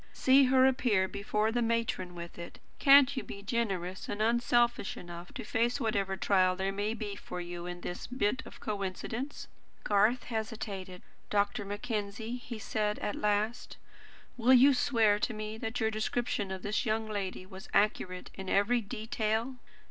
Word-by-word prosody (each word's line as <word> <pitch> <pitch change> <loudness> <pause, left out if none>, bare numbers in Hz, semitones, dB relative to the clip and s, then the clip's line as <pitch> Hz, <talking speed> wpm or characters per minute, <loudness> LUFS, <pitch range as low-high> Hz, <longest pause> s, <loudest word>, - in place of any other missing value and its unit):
See 265 +1 +5
her 260 0 +5
appear 240 -7 +3
before 210 +3 -1
the 240 +1 0
matron 230 -6 -1
with 170 0 -8
it! 170 - -8 0.2
Can't 280 -1 +7
you 255 - -1
be 200 - -9
generous 195 -5 -2
and 205 - -3
unselfish 240 0 +2
enough 175 0 -9
to 250 - -5
face 235 +4 0
whatever 200 -5 0
trial 185 -1 +3
there 190 +1 -1
may 205 +3 -2
be 210 -3 -5
for 180 - -7
you 175 0 -6
in 175 0 -6
this 175 - -5
bit 250 -2 0
of - - -11
a - - -22
coincidence?" 215 +7 -4 0.4
Garth 215 +4 +3
hesitated. 210 -5 -5 0.3
"Dr. 205 +1 0
Mackenzie," 210 +2 -4
he 245 -1 -7
said 210 0 -1
at 205 - -2
last, 210 +3 -1 0.6
"will 250 +2 +5
you 270 +3 +7
swear 225 -6 +3
to 225 - -1
me 215 0 -5
that 225 +2 -3
your 220 -1 +1
description 220 -1 -1
of 190 -1 -5
this 210 +3 0
young 220 -2 0
lady 195 -3 -4
was 190 0 -11
accurate 185 -3 0
in 190 -1 -7
every 210 +5 +3
detail?" 220 +2 -2
215 Hz, 165 wpm, -31 LUFS, 195-235 Hz, 0.6 s, Can't